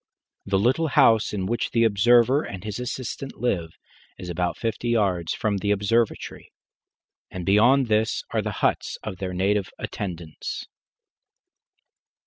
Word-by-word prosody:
The 100 -1 +2
little 130 +11 +2
house 115 -6 +4
in 95 -3 -2
which 115 +4 -1
the 115 -1 +2
observer 120 +5 +4
and 95 -9 -7
his 105 +1 -5
assistant 130 +2 -5
live 85 -10 -2 0.4
is 90 - -8
about 90 +1 -1
fifty 115 +1 -2
yards 95 -8 +1
from 105 -2 -1
the 100 +1 -2
observatory, 105 +3 0 0.8
and 90 -1 -6
beyond 120 +8 +5
this 110 -1 +1
are - - +1
the - - -3 0.2
huts - - 0
of 95 - -5
their 90 -1 -4
native 100 +1 +1
attendants. 85 -5 -6
105 Hz, 135 wpm, -24 LUFS, 95-120 Hz, 0.8 s, beyond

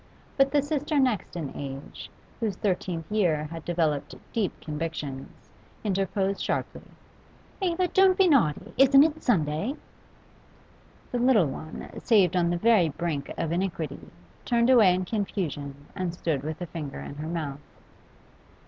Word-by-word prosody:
But 270 -1 +4
the 290 -2 +3
sister 295 0 -1
next 250 -11 +1
in 155 -6 -5
age, 135 0 -7 0.3
whose 220 -5 -1
thirteenth 180 -3 -2
year 175 -8 +2
had 165 -1 -7
developed 155 -4 -1 0.2
deep 215 -5 -1
convictions, 150 -8 -6 0.3
interposed 195 -1 0
sharply - - -2 0.8
'Eva, 365 -1 +1
don't 380 0 +4
be 385 - +5
naughty! 205 - +2
Isn't 275 +1 +8
it 315 0 0
Sunday?' 165 - +1 1.4
The 245 - -1
little 240 -7 +5
one, 155 +3 -6
saved 195 -6 +3
on 175 -1 +2
the 175 - 0
very 200 -4 +4
brink 150 -2 -3
of 165 -1 -2
iniquity, 170 -5 -3 0.3
turned 235 +1 +3
away 210 -8 +6
in 185 0 -2
confusion 150 -9 -3
and 180 -2 -3
stood 160 -6 -1
with 155 +3 -5
a - - -3
finger 155 -5 -6
in 140 - -8
her 155 +1 -5
mouth. 155 -4 -4
180 Hz, 140 wpm, -27 LUFS, 155-235 Hz, 1.4 s, Isn't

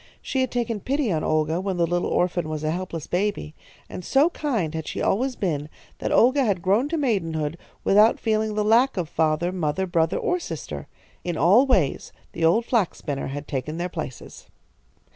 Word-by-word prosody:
She 265 - -2
had 260 - 0
taken 235 -3 -2
pity 270 +1 -1
on 155 -2 0
Olga 155 +2 +1
when 190 -2 -2
the 170 - +3
little 175 +1 -1
orphan 175 -3 0
was 155 -1 -4
a 155 - 0
helpless 170 -2 -4
baby, 185 -4 -2 0.3
and 180 - -7
so 285 - +3
kind 225 - -2
had 160 -1 -4
she - - -4
always 250 +6 0
been 150 -6 -2 0.3
that - - -2
Olga 260 +4 +4
had 195 -7 0
grown 210 +9 +2
to 330 - -1
maidenhood 165 - -1 0.3
without 210 +3 +5
feeling 215 -1 0
the 210 - +1
lack 235 +3 +4
of 175 -3 -1
father, 160 +3 0
mother, 180 +1 -1
brother, 170 -2 +1
or 360 - 0
sister. - - -6 0.4
In 175 -3 -3
all 205 - +5
ways 185 - +1 0.2
the 165 - -4
old 180 +9 +4
flax 225 -8 +1
spinner 140 -3 -4
had 145 +2 -6
taken 140 +4 -3
their 175 +1 -2
places. 155 -7 -8
180 Hz, 190 wpm, -24 LUFS, 160-230 Hz, 0.4 s, without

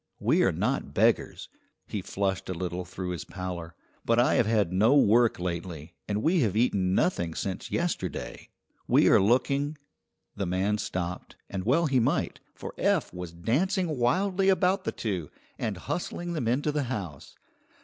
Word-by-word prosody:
We - - +3
are - - +4
not - - -2
beggars" - - +1 0.4
he 105 - -4
flushed 95 0 -2
a 95 - -2
little 90 +1 -4
through 90 +1 -5
his 85 -4 -4
pallor 90 -3 -6 0.3
"but 115 - +2
I 120 - +4
have 115 - +3
had 105 -6 +1
no 110 +9 +4
work 120 -3 +4
lately, 85 -2 -5
and 105 +1 -1
we 170 +2 +3
have 110 - +1
eaten 95 -6 +2
nothing 85 - 0
since 95 -2 -4
yesterday. 170 - -3 0.4
We - - +5
are - - +6
looking 140 +7 +1 0.3
" - - -53
The 100 -2 -2
man 95 +4 0
stopped, 90 -2 -4 0.2
and 95 0 -4
well 165 +7 +3
he 135 -4 +2
might, 115 - 0 0.2
for - - -7
Eph - - +1
was 90 -2 -6
dancing 155 - 0
wildly 185 +10 +2
about 190 0 +2
the - - 0
two, 95 -9 -3 0.3
and 105 -4 -2
hustling 175 - -4
them 145 -8 -2
into 140 +6 +1
the 145 -2 -1
house. 95 - -6
105 Hz, 170 wpm, -28 LUFS, 90-140 Hz, 0.4 s, are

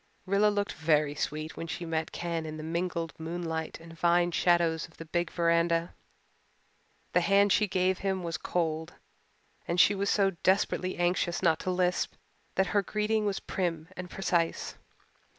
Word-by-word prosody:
Rilla 200 +2 +3
looked 205 -1 -1
very 155 -2 +2
sweet 155 +2 -3
when 165 - -5
she 170 +1 -4
met 160 -1 -2
Ken 170 -1 -3
in 155 0 -6
the 155 - -6
mingled 170 -1 -2
moonlight 160 -1 -4
and 165 0 -12
vine 175 +1 +2
shadows 170 -2 +2
of 160 - -23
the 165 - -8
big 170 +1 -1
veranda. 170 0 +1 1.2
The - - +4
hand 200 0 +4
she 210 - +3
gave 185 0 +1
him 190 -2 -1
was 170 -1 -3
cold 160 -2 -2 0.7
and 170 +1 0
she 200 - +7
was 200 0 -1
so 195 -2 +3
desperately 185 -1 +1
anxious 175 0 0
not 165 -3 +3
to - - -3
lisp 180 0 0 0.4
that 190 - +3
her 205 - +4
greeting 210 +1 0
was 195 -1 -1
prim 165 -3 -3
and 180 0 -7
precise. 175 -3 -1
175 Hz, 165 wpm, -29 LUFS, 165-190 Hz, 1.2 s, she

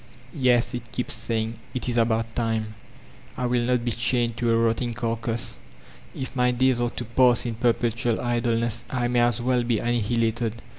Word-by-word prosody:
— 125 0 -21
^'•Yes," 125 -4 +3
it 120 -1 -6
keeps 125 - -2
saying, 115 0 -2 0.2
"it 125 - -3
is 120 - 0
about 115 -1 +1
time! 110 -2 -1 0.6
I 125 - -1
will 120 0 +1
not 125 0 0
be 120 - 0
chained 120 0 +1
to 120 - 0
a 115 - +3
rotting 115 +1 0
carcass. 115 -1 -2 0.6
If 130 +1 -6
my 125 -1 +3
days 125 0 +2
are 120 - +2
to 120 - -4
pass 120 +1 +3
in 120 - -2
per 120 +2 +2
pettul 115 0 -1
idleness 120 -1 0
I 125 -2 -1
may 120 0 +2
as 120 0 +2
well 125 0 +2
be 120 -1 0
annihilated. 115 0 -1
120 Hz, 190 wpm, -25 LUFS, 115-125 Hz, 0.6 s, ^'•Yes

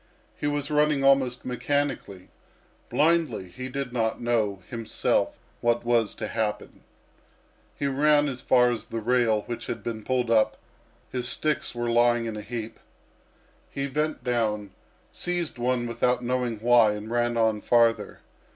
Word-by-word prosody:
He 145 - -3
was 145 0 -2
running 150 -2 +2
almost 135 -2 +3
mechanically, 125 -7 -2 0.6
blindly; 155 - +1
he 130 +8 -7
did 135 -1 -4
not 115 -2 0
know 110 -5 0
himself 115 -3 -1 0.2
what 120 0 +1
was 120 -3 +2
to - - -4
happen. 110 -2 -3 0.9
He 145 - -3
ran 145 +2 +3
as 130 -2 -4
far 125 -1 +4
as 115 - -4
the 115 - -4
rail 115 -2 +2
which 120 - -6
had 115 -3 -5
been 110 -2 -4
pulled 125 -1 0
up; 110 -1 +3 0.5
his 125 -1 -2
sticks 155 -4 -1
were 120 0 -2
lying 120 0 +3
in 110 -1 -4
a 105 - -5
heap. 115 -1 -6 0.9
He 140 0 -3
bent 150 -1 -2
down, 110 -5 -1 0.4
seized 175 -7 -2
one 125 0 0
without 125 +1 0
knowing 125 -2 -1
why, 120 -2 +5
and 105 +2 -7
ran 120 0 +1
on 110 -2 +2
farther. 115 -1 +2
120 Hz, 150 wpm, -26 LUFS, 115-135 Hz, 0.9 s, why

